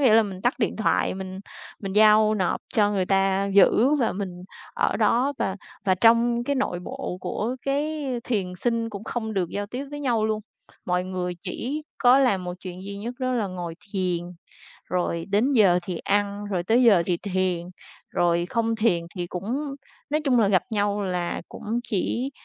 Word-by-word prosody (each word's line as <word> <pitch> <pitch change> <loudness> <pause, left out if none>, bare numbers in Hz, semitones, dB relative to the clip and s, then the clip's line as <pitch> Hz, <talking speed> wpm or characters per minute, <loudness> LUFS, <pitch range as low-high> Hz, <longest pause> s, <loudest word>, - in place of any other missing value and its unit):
nghĩa 250 -6 +5
là 225 - +7
mình 195 -3 -6
tắt 245 - +2
điện 225 - 0
thoại, 220 - +1
mình 190 0 -6 0.4
mình 195 -2 -4
giao 215 +1 +6
nộp 185 -4 0
cho 205 -2 +4
người 190 -3 0
ta 195 0 +2
giữ 225 +7 +5
và 240 - +1
mình 185 -2 -5 0.3
ở - - +1
đó. 255 +4 +2
Và 190 - -1 0.3
và 190 - +3
trong 235 +4 +4
cái 280 +2 0
nội 180 -9 -1
bộ 255 -2 -5
của 235 +7 -2
cái, 295 +2 -1
ơ, - - -2
thiền 195 -7 -1
sinh 230 +3 -1
cũng 205 0 -7
không 220 -2 -3
được 185 -3 0
giao 205 +3 -3
tiếp 250 +6 -5
với 290 0 -6
nhau 240 -6 +1
luôn. 215 0 0 0.4
Mọi 180 0 0
người 180 -1 -3
chỉ 290 +6 -4 0.2
có 250 +1 +6
làm 205 -9 +2
một 180 0 -4
chuyện 185 0 -8
duy 200 0 -6
nhất 235 +4 -5
đó 255 -1 -1
là 230 -5 0
ngồi 175 -3 -5 0.2
thiền, 185 -3 0 0.7
rồi 170 -2 -1
đến 215 +8 +2
giờ 195 -9 +5
thì 175 -1 -4
ăn, 205 +1 0
rồi 180 -3 -1
tới 230 +7 +3
giờ 200 -8 +6
thì 175 -1 0
thiền, 185 -2 -1 0.4
rồi 175 0 +1
không 230 -1 0
thiền 215 -7 +2
thì 175 -2 -2
cũng 195 +9 -3 0.5
nói 305 +1 +1
chung 265 -5 +3
là 215 - +4
gặp 190 -2 +3
nhau 205 -1 0
là 180 -3 -2
cũng 225 +3 -3
chỉ, 245 +4 -1
205 Hz, 195 wpm, -25 LUFS, 185-235 Hz, 0.7 s, là